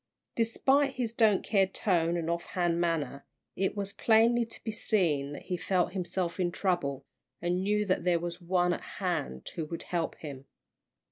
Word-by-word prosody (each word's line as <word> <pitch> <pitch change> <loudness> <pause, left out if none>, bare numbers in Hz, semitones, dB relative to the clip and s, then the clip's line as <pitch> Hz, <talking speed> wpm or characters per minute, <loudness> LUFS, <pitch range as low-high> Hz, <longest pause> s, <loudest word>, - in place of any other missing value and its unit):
Despite 265 +5 +2
his 235 -3 -2
"don't 220 -4 +4
care" 195 -3 +3
tone, 175 -3 +1
and 165 -1 -2
off 170 +1 -2
hand 175 -2 0
manner, 160 -5 -1 0.3
it 195 +2 -1
was 200 0 -2
plainly 230 +1 +4
to 230 - -10
be 220 - -2
seen 165 -10 +1
that - - -8
he 180 -1 -2
felt 180 0 0
himself 180 -1 -2
in 175 -1 +1
trouble, 145 -8 -1 0.3
and 175 +1 0
knew 210 +2 +1
that 185 -3 +1
there 175 -1 +3
was 175 +1 -5
one 175 0 +2
at - - -4
hand 65 0 -3
who 160 - -4
would 165 +2 -5
help 170 -2 -2
him. 140 -3 -8
180 Hz, 180 wpm, -30 LUFS, 170-205 Hz, 0.3 s, don't